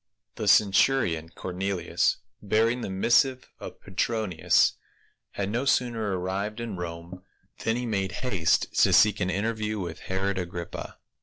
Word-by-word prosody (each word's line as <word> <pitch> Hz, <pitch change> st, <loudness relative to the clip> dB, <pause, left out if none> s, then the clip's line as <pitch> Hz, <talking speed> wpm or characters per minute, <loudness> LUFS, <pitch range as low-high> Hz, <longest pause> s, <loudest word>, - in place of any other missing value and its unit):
THE -, -, -5 dB
centurion 95 Hz, -5 st, +3 dB
Cornelius, 90 Hz, 0 st, -1 dB, 0.2 s
bearing 115 Hz, +4 st, +1 dB
the -, -, -4 dB
missive 125 Hz, +7 st, +2 dB
of -, -, -9 dB
Petronius, 100 Hz, -2 st, +1 dB, 0.6 s
had 100 Hz, 0 st, -3 dB
no 120 Hz, +4 st, -1 dB
sooner 115 Hz, -7 st, 0 dB
arrived 100 Hz, +4 st, -3 dB
in 115 Hz, -4 st, -4 dB
Rome 85 Hz, +1 st, -7 dB, 0.4 s
than 115 Hz, -, +1 dB
he 125 Hz, +1 st, -3 dB
made 100 Hz, -5 st, -2 dB
haste 90 Hz, -11 st, +1 dB
to -, -, +5 dB
seek 105 Hz, -1 st, +5 dB
an 90 Hz, -2 st, 0 dB
interview 110 Hz, +2 st, -2 dB
with 85 Hz, -3 st, -5 dB
Herod 95 Hz, +1 st, -2 dB
Agrippa. 85 Hz, -1 st, -6 dB
100 Hz, 135 wpm, -26 LUFS, 90-115 Hz, 0.6 s, to